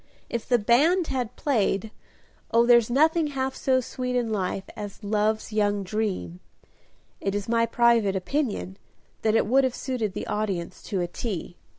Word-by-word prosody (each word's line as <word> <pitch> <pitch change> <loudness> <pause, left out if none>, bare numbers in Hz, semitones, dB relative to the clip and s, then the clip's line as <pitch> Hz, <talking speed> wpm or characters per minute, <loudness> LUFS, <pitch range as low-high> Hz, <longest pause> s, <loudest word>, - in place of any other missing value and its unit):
If 235 -2 -4
the 245 - +5
band 300 - +3
had 250 -4 -2
played 215 -6 0 0.6
"Oh, 235 0 +4
there's 235 -2 +5
nothing 315 +5 +3
half 265 -2 -2
so 260 -1 +2
sweet 250 0 -4
in 240 -2 0
life 190 -2 -1
As 205 0 -8
love's 215 +1 0
young 205 -1 +1
dream 185 - -3 0.4
" - - -35 0.3
it 195 0 -1
is 205 -1 -3
my 230 0 +2
private 230 -4 +3
opinion 195 -2 -2 0.4
that 220 0 +2
it - - +3
would 265 +5 +4
have 260 -2 0
suited 235 -7 -2
the - - -4
audience 195 -5 -3
to 190 -3 0
a 175 - -1
T. 175 -2 -5
225 Hz, 170 wpm, -26 LUFS, 205-250 Hz, 0.6 s, the